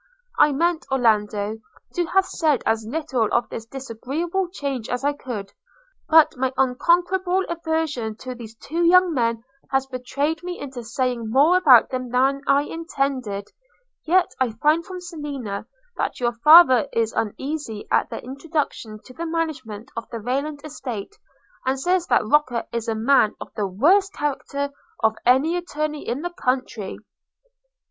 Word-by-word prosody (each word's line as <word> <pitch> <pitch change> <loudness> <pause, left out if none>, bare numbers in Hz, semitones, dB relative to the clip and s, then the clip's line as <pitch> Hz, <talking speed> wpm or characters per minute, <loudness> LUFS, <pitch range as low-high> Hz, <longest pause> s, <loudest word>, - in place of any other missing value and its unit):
I 295 - +6
meant, 335 +3 0
Orlando, 215 -4 +1 0.3
to 350 -1 0
have 385 +2 +3
said 310 -8 0
as 225 0 +1
little 260 -5 -1
of 240 - +1
this 225 0 -7
disagreeable 275 +9 -3
change 275 - -4
as 250 +1 -2
I 290 +1 +2
could; 220 -8 -6 0.6
but 315 -1 +6
my 260 0 0
unconquerable 355 +8 +2
aversion 320 -9 -2
to 255 +3 -7
these 230 -2 -10
two 325 +8 -4 0.3
men 230 -5 0 0.3
has 270 -1 +1
betrayed 275 +5 -2
me 355 0 -6
into 265 -4 -7
saying 245 -1 -2
more 285 +9 +5
about 280 -11 +6
them 255 -1 -3
than 265 +3 +2
I 280 +1 +4
intended: 275 -11 -3 0.5
yet 360 +2 +3
I 250 -4 +1
find 300 +8 +2
from 365 +1 -8
Selina, 285 - -6 0.3
that - - -2
your 240 -1 0
father 260 -1 +7
is 225 -1 0
uneasy 235 0 -4
at - - +2
their - - -6
introduction 275 -5 -4
to 255 - -13
the 335 +6 -5
management 275 -9 -4
of 230 - -6
the 230 - -5
Rayland 280 +6 -2
estate, 265 - -6 0.5
and 260 +1 0
says 355 +4 +1
that 240 - +3
Roker 255 -1 +2
is 235 0 -3
a 225 - 0
man 220 -1 +3
of - - -9
the 205 -2 -1
worst 365 - +3
character 280 -1 -3 0.3
of 220 0 +3
any 270 +7 +4
attorney 305 -4 -3
in 260 +6 -2
the 350 - -3
country. 255 - -2
270 Hz, 155 wpm, -23 LUFS, 235-320 Hz, 0.6 s, father